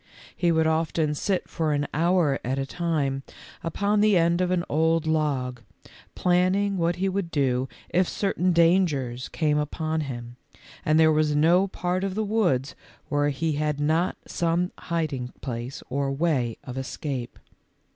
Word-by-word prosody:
He 175 -1 +2
would 160 -1 +3
often 160 -1 +1
sit 185 +5 -1
for 155 -2 -1
an 145 0 0
hour 165 -3 +2
at 130 +3 -1
a 135 - -1
time 145 -4 -1 0.4
upon 205 +5 +1
the 210 -3 +5
end 170 +1 +2
of 180 - +1
an 180 -1 +1
old 160 +1 +2
log, 140 -6 0 0.5
planning 185 +3 +2
what 170 +1 +1
he 190 +2 -1
would 190 -2 -2
do 130 -4 0 0.2
if 180 +1 +2
certain 185 -2 0
dangers 165 -8 +2
came 150 -2 +1
upon 155 +2 -2
him, 120 -4 -6 0.5
and 155 +1 +3
there 160 0 +6
was 155 -1 +2
no 170 +6 +4
part 180 0 -2
of 195 -1 -2
the 220 - 0
woods 175 - +1 0.4
where 145 0 +2
he 160 +3 -1
had 150 0 -1
not 160 +4 +1
some 170 +2 0
hiding 145 -7 -3
place 120 0 -5
or 135 +1 -1
way 135 -6 0
of 130 -2 -6
escape. 130 -2 -5
160 Hz, 155 wpm, -25 LUFS, 140-175 Hz, 0.5 s, there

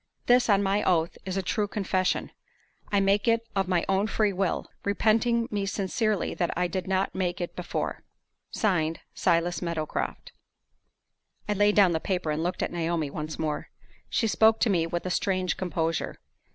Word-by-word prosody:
This, 245 -1 +4
on 200 -1 +4
my 200 +1 +1
oath, 170 -2 +1
is 190 0 -3
a 195 - -1
true 205 +3 0
confession. 190 -2 -1 0.6
I 200 - +3
make 195 +3 +2
it 230 0 +2
of 195 -1 +1
my 180 -2 +1
own 195 +2 +2
free 210 -1 +1
will, 190 -1 -1 0.2
repenting 230 +3 +2
me 200 -2 -1
sincerely 205 +1 0
that 175 - -1
I 180 - +2
did 180 +1 -3
not 190 0 0
make 180 0 -1
it 175 - -4
before." - - -3 0.5
(Signed) 165 -6 0
"SILAS 170 +1 +1
MEADOWCROFT." 170 -3 -3 1.2
I 210 - +1
laid 205 +1 +3
down 195 -4 +6
the 160 - 0
paper, 180 -3 -1
and 150 +1 -1
looked 175 +2 -1
at - - -2
Naomi 165 -3 -1
once 155 +1 -5
more. 155 -2 -3 0.4
She 230 - +1
spoke 220 +1 +4
to 225 - +3
me 165 -3 +2
with 175 +1 -3
a 185 - -2
strange 185 -1 0
composure. 165 -2 -2
190 Hz, 175 wpm, -27 LUFS, 170-205 Hz, 1.2 s, down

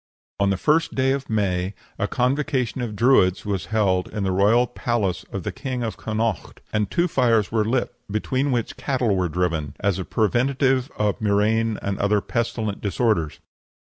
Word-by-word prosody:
On 100 0 +3
the 95 - +1
first 155 - +1
of 135 +1 +1
May 95 -3 0 0.2
a - - +1
convocation 130 -1 0
of 115 -4 -4
Druids 110 -5 +3
was 100 -2 -2
held 95 -4 +1
in 105 -2 -4
the 95 - 0
royal 105 +6 +4
palace 115 -6 -2
of - - -4
the - - -3
King 130 -2 -4
of 115 - -3
Connaught, 110 -1 -3
and 105 -2 0
two 175 +1 +1
fires 115 - +2
were 110 -1 +2
lit, 120 +3 0 0.2
between 130 +7 0
which 125 +3 -2
cattle 130 -6 0
were 90 -2 0
driven, 80 -3 -1
as 100 -2 0
a - - -2
preventive 130 +5 +1
of 105 0 0
murrain 110 +1 +2
and 100 -1 -2
other 105 +1 +2
pestilential 110 -2 -2
disorders. 100 - 0
110 Hz, 170 wpm, -23 LUFS, 100-125 Hz, 0.2 s, royal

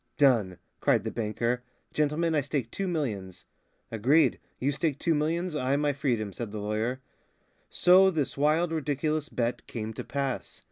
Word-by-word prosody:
Done!" 115 -10 +3 0.2
cried - - +3
the - - -3
banker. 115 +2 -1 0.3
"Gentlemen, 155 +2 +1
I 150 - +3
stake 135 -4 -3
two 195 - -2
millions." 110 - -3 0.5
"Agreed. 125 +9 +3 0.2
You 135 +3 0
stake 145 0 -1
two 165 - +1
millions, 160 +3 0
I 135 -1 +1
my 145 0 +1
freedom," 120 -8 -1
said 115 0 -5
the 110 - -5
lawyer. 110 +5 -2 0.7
So 185 +2 +6
this 155 -7 -1
wild, 155 +4 +2
ridiculous 155 0 -1
bet 120 0 -2
came 110 -1 -5
to - - -6
pass. 140 -2 -3
140 Hz, 155 wpm, -28 LUFS, 115-155 Hz, 0.7 s, So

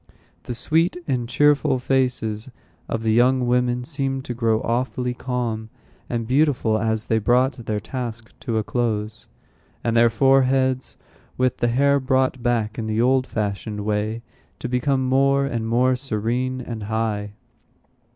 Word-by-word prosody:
The 120 - -4
sweet 165 +8 +2
and 125 -4 -1
cheerful 145 +1 +3
faces 125 -4 -1 0.4
of 115 - -2
the 110 -1 +2
young 125 +2 +3
women 125 0 +1
seemed 135 -1 -3
to 125 - -3
grow 115 -2 +1
awfully 125 +1 -1
calm 120 -3 -3 0.4
and 115 -1 -2
beautiful 125 -4 +2
as 110 -1 -1
they 110 - +1
brought 125 +2 +1
their 105 -1 -1
task 115 0 -6
to 115 -2 -2
a 110 - +1
close, 110 -2 -2 0.6
and 115 -1 0
their 115 0 +6
foreheads, 130 +1 +2 0.4
with 130 -1 +1
the 120 - +1
hair 140 +4 +3
brought 130 -1 +1
back 115 -3 0
in 110 - -3
the 110 0 -1
old 130 +2 +3
fashioned 105 0 -3
way, 110 +2 -1 0.3
to - - -5
become 130 +2 0
more 135 +1 +3
and 115 -4 -2
more 125 +3 +3
serene 125 +1 -2
and 115 -4 -6
high. 105 -2 -2
120 Hz, 150 wpm, -22 LUFS, 110-130 Hz, 0.6 s, their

